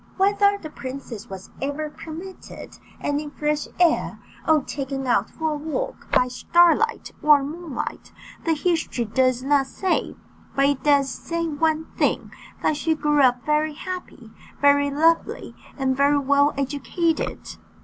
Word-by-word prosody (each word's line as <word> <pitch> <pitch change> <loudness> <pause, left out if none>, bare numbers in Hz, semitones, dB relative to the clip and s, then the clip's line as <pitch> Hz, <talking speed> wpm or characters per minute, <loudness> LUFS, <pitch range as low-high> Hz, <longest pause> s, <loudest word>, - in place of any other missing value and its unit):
Whether 405 +1 +3
the 310 -6 -9
princess 260 -6 -7
was 190 -1 -9
ever 290 +2 -3
permitted 340 +5 -10 0.2
any 290 +1 -2
fresh 300 0 -2
air, 345 -3 +2 0.3
or 310 -3 +4
taken 270 -1 -4
out 235 -5 +2
for 320 -1 -2
a - - -1
walk 315 +12 -5
by 250 - +4
starlight 345 - +2
or 295 -2 +6
moonlight, 310 0 -6 0.3
the 325 -1 +1
history 320 -7 0
does 255 +3 +1
not 275 -1 +2
say; 375 +6 -1 0.4
but 275 - +3
it 280 -1 +1
does 285 -2 +4
say 335 +6 -3
one 315 0 0
thing, - - 0 0.3
that 305 - +2
she 320 +1 +1
grew 295 -1 +2
up 250 -2 +3
very 300 0 +1
happy, 355 -10 -7 0.3
very 285 0 +4
lovely, 325 +4 +1 0.2
and 265 -1 +1
very 285 +2 +3
well 285 +1 +3
educated. 300 +4 -2
295 Hz, 140 wpm, -23 LUFS, 275-320 Hz, 0.4 s, or